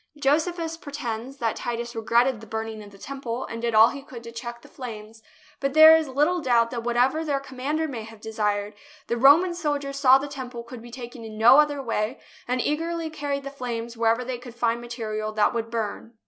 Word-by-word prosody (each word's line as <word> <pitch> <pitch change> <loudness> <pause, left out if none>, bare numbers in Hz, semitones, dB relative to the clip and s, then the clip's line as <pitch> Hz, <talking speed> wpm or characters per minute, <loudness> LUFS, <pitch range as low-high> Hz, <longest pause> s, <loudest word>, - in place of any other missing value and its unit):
Josephus 325 +3 0
pretends 270 -4 -5
that 230 -4 -1
Titus 235 0 -4
regretted 235 +1 +2
the 220 - -11
burning 220 0 -4
of 205 - -11
the 200 - -16
Temple 255 0 -5
and 230 - -6
did 235 -1 -1
all 220 +1 +8
he 280 - -7
could 255 -4 -11
to 230 - -9
check 235 0 -7
the - - -14
flames, 220 -3 -9 0.4
but 275 +1 -2
there 315 +1 +10
is 320 -1 +1
little 300 +7 +1
doubt 235 -4 +3
that 240 -2 -3
whatever 245 +6 +2
their 285 -3 0
commander 275 +4 -3
may 250 -6 -5
have 220 0 -11
desired, 210 -1 -2 0.3
the 235 - -1
Roman 290 +9 +6
soldiers 290 -5 -2
saw 265 -2 +7
the 275 +1 -4
Temple 255 -4 -7
could 235 0 -10
be 240 - -11
taken 240 -1 -9
in 220 -1 -8
no 235 +6 +7
other 290 -2 +2
way, 225 +1 -2 0.3
and 250 +1 0
eagerly 325 +3 -2
carried 285 -2 -3
the 275 - -6
flames 235 -3 -5
wherever 230 +2 +1
they 250 -1 -4
could 245 -1 -11
find 235 0 0
material 215 -3 -4
that 215 -1 +2
would 230 -1 -2
burn. 225 0 -4
245 Hz, 210 wpm, -25 LUFS, 230-280 Hz, 0.4 s, there